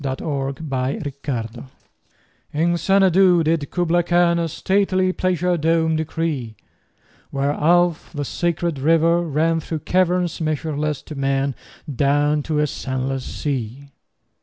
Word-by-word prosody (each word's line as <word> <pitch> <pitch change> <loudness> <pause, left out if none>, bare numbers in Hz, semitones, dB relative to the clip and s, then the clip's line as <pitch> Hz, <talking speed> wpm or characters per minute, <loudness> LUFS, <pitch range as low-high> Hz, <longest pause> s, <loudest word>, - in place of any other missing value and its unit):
Kubla 135 0 -2
Khan 130 -3 -4 0.8
IN 170 +3 +1
Xanadu 190 -1 +4
did 155 -2 0
Kubla 175 -1 +1
Khan 175 0 +2
A 165 - 0
stately 185 +2 +1
pleasure 180 -1 0
dome 160 0 +2
decree: 155 -7 -3 0.7
Where 140 +1 0
Alph, 175 +2 +2
the 145 -3 -4
sacred 170 -1 -1
river, 165 +3 +3
ran 165 +1 +1
Through 160 -1 -5
caverns 180 -2 +1
measureless 155 -1 -2
to - - -9
man 135 0 0 0.3
Down 145 +2 +1
to 155 +1 -2
a 150 - +3
sunless 130 -1 -3
sea. 135 -1 -4
155 Hz, 115 wpm, -21 LUFS, 140-170 Hz, 0.8 s, Xanadu